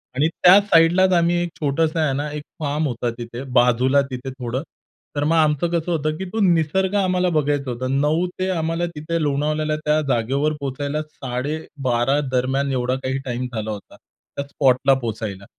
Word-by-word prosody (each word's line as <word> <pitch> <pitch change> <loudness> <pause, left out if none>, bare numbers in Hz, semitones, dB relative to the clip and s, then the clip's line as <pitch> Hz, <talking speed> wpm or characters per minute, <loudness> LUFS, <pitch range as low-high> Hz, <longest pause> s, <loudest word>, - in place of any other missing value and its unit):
आणि 145 +4 +3
त्या 180 +3 +6
साइडलाच 185 0 +4
आम्ही 170 0 +3
एक 175 - -3
छोटंसं 155 +2 0
आहे 155 -4 +1
ना, 145 +2 -2
एक 150 0 -5 0.2
फार्म 150 0 -1
होता 120 -2 -2
तिथे 120 +1 -7 0.2
बाजूला 125 +3 +3
तिथे 130 +1 -5
थोडं. 125 0 -4 0.5
तर 145 - 0
मग 160 +3 +2
आमचं 155 0 +2
कसं 170 0 -1
होतं 155 -2 0
की 190 - -4
तो 225 - -1
निसर्ग 185 +1 +2
आम्हाला 185 -2 +2
बघायचा 145 -2 0
होता. 125 +2 -3
9 150 +6 +1
ते 185 0 0
आम्हाला 165 -1 -1
तिथे 165 +2 -2
लोणावळ्याला 150 +1 0
त्या 150 +1 +3
जागेवर 135 +5 +1
पोहोचायला 140 +2 -3
12:30 135 -2 -2
दरम्यान 135 +2 0
एवढा 125 0 0
काही 130 +1 -1
टाईम 125 0 -3
झाला 110 -1 -3
होता, 105 -1 -9
त्या 140 - -10
स्पॉटला 135 -1 +3
पोहोचायला 110 -4 -5
145 Hz, 170 wpm, -21 LUFS, 130-160 Hz, 0.5 s, त्या